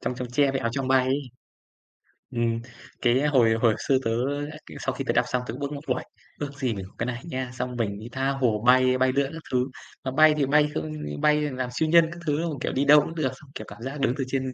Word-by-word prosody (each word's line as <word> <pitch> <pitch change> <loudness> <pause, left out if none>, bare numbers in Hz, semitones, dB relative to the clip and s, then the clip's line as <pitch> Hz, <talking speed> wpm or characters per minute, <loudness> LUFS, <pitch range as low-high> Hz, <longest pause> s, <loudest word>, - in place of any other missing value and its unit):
Chong - - -2
chóng 125 0 -5
tre 140 +2 +3
với 135 0 -2
Áo 115 - -1
choàng 135 0 -2
bay 130 -1 +4
ấy. 135 +2 0 1.1
Ừm, 115 -1 0 0.4
cái 125 +1 +3
hồi 125 -6 +4
hồi 115 -1 +3
xưa 135 - +4
tớ 115 - +1 0.4
á 155 - -10
cái - - -10
sau - - -2
khi - - -4
tớ - - +2
đọc - - +3
xong 125 - -1
tớ - - -4
cũng 130 - -8
ước 140 - -2
mơ: 145 - -5 0.2
"Uầy, - - -4 0.4
ước 145 -1 -4
gì 130 -4 0
mình 95 -3 -6
có - - -25
cái 120 - -1
này 125 -1 -4
nha, 130 -6 -4
xong 125 0 -4
mình 100 -4 -2
đi 110 - -8
tha 135 +1 -1
hồ 125 -6 0
bay 130 0 +5
bay 130 0 +3
lượn 140 0 +1
các 165 - -7
thứ." 125 -1 +2 0.4
Mà 130 - -2
bay 155 +3 +6
thì 145 - +2
bay 150 +2 +4
không 80 0 -3
như 75 -1 -6
bay 150 0 +4
làm 130 -4 -2
siêu 155 +6 0
nhân 165 0 +6
các 170 - -9
thứ, 145 -2 +1
đúng 170 - -1
không? 145 - -6
Kiểu, - - -2
đi 135 +2 +1
đâu 150 +1 +8
cũng 160 +3 -6
được, 155 -5 0
xong, 150 - -17
kiểu, - - -6
cảm - - -12
giác 135 +4 -5
đứng 135 -2 +2
từ 135 - -1
trên 130 0 -2
130 Hz, 285 wpm, -25 LUFS, 125-145 Hz, 1.1 s, đâu